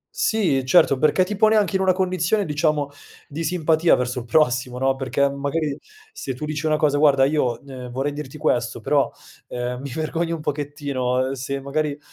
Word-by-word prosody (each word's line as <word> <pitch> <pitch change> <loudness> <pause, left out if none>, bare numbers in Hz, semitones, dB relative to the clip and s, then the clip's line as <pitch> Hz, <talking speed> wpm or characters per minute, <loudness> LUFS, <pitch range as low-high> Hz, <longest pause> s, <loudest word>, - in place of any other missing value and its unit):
Sì, 200 - +1
certo. 140 -1 +4
Perché 155 +5 +3
ti 210 +3 -4
pone 215 +1 +4
anche 210 -2 +2
in 190 - +2
una 190 - +4
condizione, 185 +2 0
diciamo, 150 -1 0 0.4
di 155 +3 -5
simpatia 165 0 +3
verso 125 0 -2
il 120 - -8
prossimo, 125 -2 +1
no, 135 +1 +1
perché, 135 +1 0
mhmm, 140 0 -6
magari 145 +1 -1 0.4
se 135 - -5
tu 150 +4 -5
dici 155 +1 -3
una 155 - +2
cosa: 145 -1 +2
"Guarda, 140 -3 +5
io, 135 -4 0
ehm, 130 -2 -8
vorrei 135 +4 -2
dirti 150 0 -7
questo, 155 - 0
però, - - +1 0.4
ehm, 125 +1 -4
mi 140 - -6
vergogno 165 +4 -2
un 160 - -7
pochettino, 140 -4 -2
ehm, - - -3
se 135 +1 -4
magari, 145 +1 -2
145 Hz, 195 wpm, -22 LUFS, 135-160 Hz, 0.4 s, Guarda